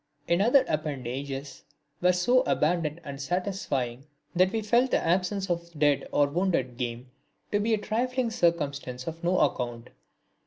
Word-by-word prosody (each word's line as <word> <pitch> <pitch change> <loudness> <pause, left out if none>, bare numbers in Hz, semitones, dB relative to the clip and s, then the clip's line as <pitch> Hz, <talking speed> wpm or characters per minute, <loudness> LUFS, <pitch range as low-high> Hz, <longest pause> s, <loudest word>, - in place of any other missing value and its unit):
Its 170 +2 +3
other 255 +5 +5
appendages 140 -2 -4 0.4
were 180 +1 +5
so 210 +9 +3
abundant 155 -1 +1
and 140 -2 -7
satisfying 140 -7 -2 0.3
that 185 +1 +4
we 225 - 0
felt 235 +4 +2
the - - +3
absence 190 +3 0
of 170 -2 -3
dead 145 -2 +2
or 145 - +4
wounded 145 -5 0
game 120 +1 -5 0.4
to 205 - +2
be 220 +2 +2
a - - -3
trifling 245 +3 -1
circumstance 140 - -1
of 165 +1 -6
no 180 +2 +2
account. 120 -2 -1
170 Hz, 150 wpm, -27 LUFS, 140-195 Hz, 0.4 s, other